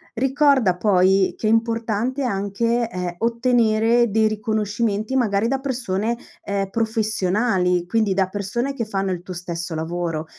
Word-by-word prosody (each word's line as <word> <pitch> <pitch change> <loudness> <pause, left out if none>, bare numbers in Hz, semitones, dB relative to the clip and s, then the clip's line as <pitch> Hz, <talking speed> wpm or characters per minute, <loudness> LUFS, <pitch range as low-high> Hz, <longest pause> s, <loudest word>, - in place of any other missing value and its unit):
ricorda 265 -5 +3
poi 190 -1 +3
che - - -5
è - - +3
importante 230 +3 0
anche, 230 +2 -1
ehm, 180 -3 -4
ottenere 235 -1 +2
dei 220 +1 +3
riconoscimenti 215 +1 -1
magari 220 -4 +1
da 270 +1 0
persone, 235 -4 -2 0.3
ehm, 195 -1 -2
professionali, 210 -4 0
quindi 205 0 +1
da 190 -1 +2
persone 205 +8 -3
che 235 - -3
fanno 195 -2 -2
il 175 -1 -3
tuo 180 0 -8
stesso 170 -1 -5
lavoro, 165 0 -3
215 Hz, 140 wpm, -22 LUFS, 190-235 Hz, 0.3 s, ricorda